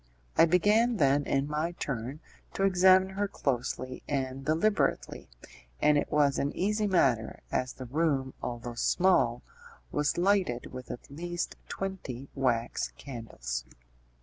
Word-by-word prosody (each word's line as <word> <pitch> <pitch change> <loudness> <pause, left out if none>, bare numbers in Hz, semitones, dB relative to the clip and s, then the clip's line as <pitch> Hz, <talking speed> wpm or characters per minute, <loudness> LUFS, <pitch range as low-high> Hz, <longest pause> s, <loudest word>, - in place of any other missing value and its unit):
I - - +7
began 210 +7 +3
then, 140 -2 +3
in 135 +1 0
my 155 +3 -1
turn, 135 -1 -4 0.3
to 195 - 0
examine 185 0 +5
her 200 +1 -1
closely 130 -5 -3
and 135 -1 -2
deliberately, 165 +9 0 0.5
and 150 - +4
it 145 - 0
was 145 -2 +3
an 140 - 0
easy 210 +2 +1
matter, 130 - +1
as 130 0 -1
the 130 - -8
room, 135 -1 0
although 120 0 -5
small, 180 +10 +2 0.5
was 150 0 0
lighted 180 -11 +1
with 125 -1 -8
at 120 - -8
least 175 +4 -4
twenty 140 -10 -5
wax 120 -3 0
candles. 85 - -5
145 Hz, 130 wpm, -29 LUFS, 130-185 Hz, 0.5 s, I